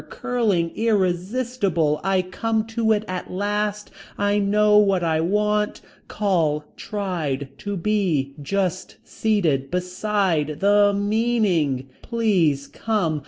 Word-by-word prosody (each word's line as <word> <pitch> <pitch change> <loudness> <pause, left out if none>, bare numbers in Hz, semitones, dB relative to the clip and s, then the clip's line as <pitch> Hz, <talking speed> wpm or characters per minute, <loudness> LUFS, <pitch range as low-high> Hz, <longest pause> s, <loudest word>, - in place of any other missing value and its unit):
Curling. 205 -9 0
Irresistible. 195 -4 0
I 190 -1 +2
come 220 +4 -1
to 225 -1 +1
it 215 0 +1
at 185 -1 -5
last. 205 +2 -2 0.3
I 205 0 +1
know 210 +1 +4
what 195 -3 +2
I 160 -1 +1
want. 210 +4 0 0.3
Call. 165 -7 0
Tried. 165 -10 -3
To 205 -1 -4
be. 170 -8 0
Just. 185 +3 -2
Seated. 165 -12 0
Beside. 180 -4 -1
The. 205 +1 +5
Meaning. 200 - +1
Please 185 - +1
come. 190 -9 -1
200 Hz, 110 wpm, -23 LUFS, 165-210 Hz, 0.3 s, The